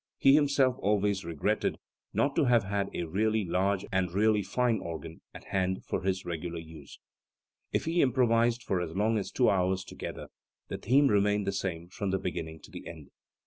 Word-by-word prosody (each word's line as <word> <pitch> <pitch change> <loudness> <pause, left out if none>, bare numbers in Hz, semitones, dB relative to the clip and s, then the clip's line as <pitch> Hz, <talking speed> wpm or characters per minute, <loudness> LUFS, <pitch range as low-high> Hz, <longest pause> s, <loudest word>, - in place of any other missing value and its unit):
He 135 - +6
himself 140 -3 +3
always 100 -1 +1
regretted 85 -3 -1 0.3
"not 140 0 +1
to - - +3
have 120 -3 +4
had 100 0 -1
a - - -3
really 105 +5 0
large 95 +3 0
and 95 -2 0
really 105 +2 +3
fine 115 +4 0
organ 80 0 -7
at - - -11
hand 95 -1 -1
for - - -2
his 95 0 -1
regular 85 0 -4
use". 80 -3 -11 0.7
If - - 0
he 165 +2 +2
improvised 120 -2 +2
for 90 -2 0
as 85 -1 -5
long 110 +2 +2
as 95 - -4
two 125 +5 +2
hours 95 0 +2
together, - - -7 0.4
the - - -4
theme 135 +7 +4
remained 105 -3 +2
the - - 0
same 90 -3 -3
from 100 +2 -3
the 95 - +1
beginning 80 -4 -5
to - - -14
the - - -9
end. 80 -4 -10
100 Hz, 185 wpm, -29 LUFS, 90-115 Hz, 0.7 s, He